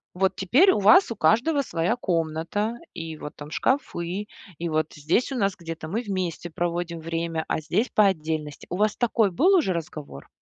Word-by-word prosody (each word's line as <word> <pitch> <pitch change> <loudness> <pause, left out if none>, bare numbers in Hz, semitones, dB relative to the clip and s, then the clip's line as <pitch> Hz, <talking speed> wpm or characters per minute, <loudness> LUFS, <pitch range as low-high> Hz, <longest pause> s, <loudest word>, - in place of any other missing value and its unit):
вот 190 +1 +1
теперь 280 - +4
у - - +1
вас 240 - +6
у - - -3
каждого 245 - +3
своя 175 0 0
комната, 170 +5 -2 0.2
и 165 -2 -6
вот 150 - -8
там 150 +1 -10
шкафы, 195 -7 -1 0.3
и 170 - -3
вот 155 0 0
здесь 160 - 0
у - - -2
нас 195 -4 +1
где-то 165 -2 -7
мы 215 +8 -2
вместе 185 -5 -3
проводим 170 0 -3
время, 165 0 -3
а 155 - -1
здесь- 215 +9 0
по 210 - +5
отдельности. 155 -4 -3
У 180 - -2
вас 215 0 +2
такой 225 -4 +2
был 355 - +4
уже 280 - +2
разговор? 150 - -7
175 Hz, 185 wpm, -25 LUFS, 160-215 Hz, 0.3 s, вас